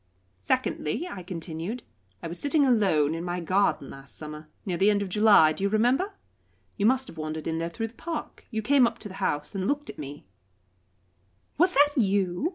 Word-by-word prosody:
"Secondly," 305 - -1
I 195 - -7
continued, 175 +5 -5 0.4
"I - - -3
was 170 +2 -5
sitting 285 0 +3
alone 190 - +3
in 165 +1 -4
my 175 0 -2
garden 180 -5 +1
last 135 0 -10
summer 155 0 -7 0.2
near 185 -4 -1
the 195 +3 +4
end 205 -1 +2
of 195 - -5
July 205 -6 +6
do 195 - -6
you 200 - +2
remember? 250 - +2 0.6
You 205 - +2
must 260 +2 +2
have 160 - -11
wandered 155 0 -4
in 160 0 -1
there 165 0 -2
through 225 +4 -4
the - - -20
park; 330 +6 -6
you 220 -2 -3
came 265 +1 +5
up 235 0 -5
to 220 - -7
the 190 - -10
house 150 +5 -1
and 190 -1 -2
looked 290 +1 -1
at - - -16
me 145 -3 -8 0.6
" 95 +1 -41
"Was 360 +2 +4
that 290 +1 +5
you?" 195 - +1
195 Hz, 205 wpm, -27 LUFS, 160-240 Hz, 0.6 s, July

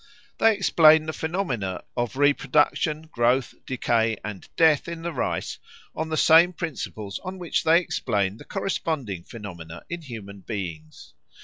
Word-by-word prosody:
They 225 -1 +5
explain 160 -5 +5
the 160 - -3
phenomena 135 - -3
of 120 0 -2
reproduction, 145 +2 +2
growth, 125 -4 +1
decay, 115 -3 +1
and 105 -3 -7
death 160 -3 +4
in 170 -1 -6
the 170 0 -3
rice 130 - -2 0.3
on 160 +1 -3
the 155 - -1
same 170 +3 +6
principles 110 - -5
on 185 +1 -7
which 175 -3 -1
they 165 +1 +5
explain 105 - -1
the - - -13
corresponding 155 - -3
phenomena 85 -7 -9
in 170 0 -4
human 110 -8 -9
beings. 85 -7 -7
135 Hz, 140 wpm, -25 LUFS, 105-165 Hz, 0.3 s, same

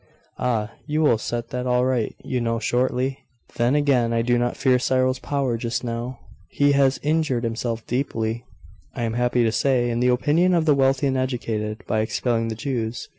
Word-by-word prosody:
'Ah, 115 -3 0 0.2
you 150 0 0
will 145 -8 +3
set 120 +1 -4
that 125 0 -3
all 125 0 +2
right, 125 -4 0
you 125 -1 -2
know, 115 0 0
shortly. 125 +3 0 0.4
Then 120 +4 +2
again, 130 -5 +2
I 115 0 +1
do 120 +1 +2
not 120 0 -1
fear 130 -2 +3
Cyril's 130 0 +1
power 135 -4 -1
just 120 +1 -3
now. 120 +1 -4 0.3
He 145 +8 +2
has 140 -1 +3
injured 150 -5 +1
himself 115 0 -3
deeply, 115 -3 -2 0.5
I 120 - -3
am 115 -1 -1
happy 120 0 +1
to 115 - +2
say, 120 0 +1
in 115 - -1
the 125 - +2
opinion 155 +8 +3
of 165 -2 +2
the 150 - +5
wealthy 135 0 +2
and 135 -1 +1
educated, 110 -4 -3
by 110 - 0
expelling 115 +1 0
the 110 - -3
Jews. 115 -1 -3
125 Hz, 190 wpm, -23 LUFS, 115-135 Hz, 0.5 s, the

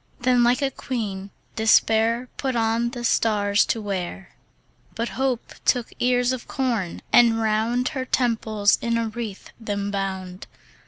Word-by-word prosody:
Then 250 0 +3
like 245 +4 +2
a 270 - +1
queen, 205 -8 -4 0.3
Despair 225 +2 +3
Put 265 -2 -2
on 230 +1 +1
the 240 -1 -7
stars 210 -3 +2
to 230 - 0
wear. 190 -1 -4 0.6
But 230 0 -2
Hope 260 -3 -2
took 245 -2 +1
ears 245 0 +2
of 255 -2 -5
corn, 235 -10 -2
and 230 -2 +6
round 225 +3 +1
Her 265 -4 -4
temples 220 -5 +1
in 235 0 0
a 230 -1 -1
wreath 215 -3 -7
them 205 -2 -3
bound. 190 -2 -4
230 Hz, 145 wpm, -23 LUFS, 205-245 Hz, 0.6 s, and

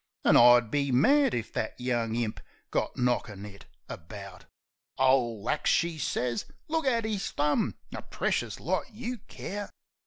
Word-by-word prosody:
An' - - +6
I'd 120 -2 +7
be 140 -2 0
mad 275 - +4
if 115 -2 -4
that 110 - -3
young 120 -3 -1
imp 115 -2 -2 0.3
got - - -1
knockin' 115 -5 -1
it 100 -1 -12 0.2
about." 95 +1 -9 0.5
"Ole 125 -5 +2
axe!" 150 - +1
she 165 -2 +1
sez. 120 -5 -1 0.2
"Look 320 -2 -1
at 230 -3 +2
'is 210 -3 -2
thumb! 150 +9 +1 0.2
A - - -5
precious - - -2
lot - - -2
you 240 +2 -5
care 200 +1 -7
125 Hz, 150 wpm, -28 LUFS, -, 0.5 s, I'd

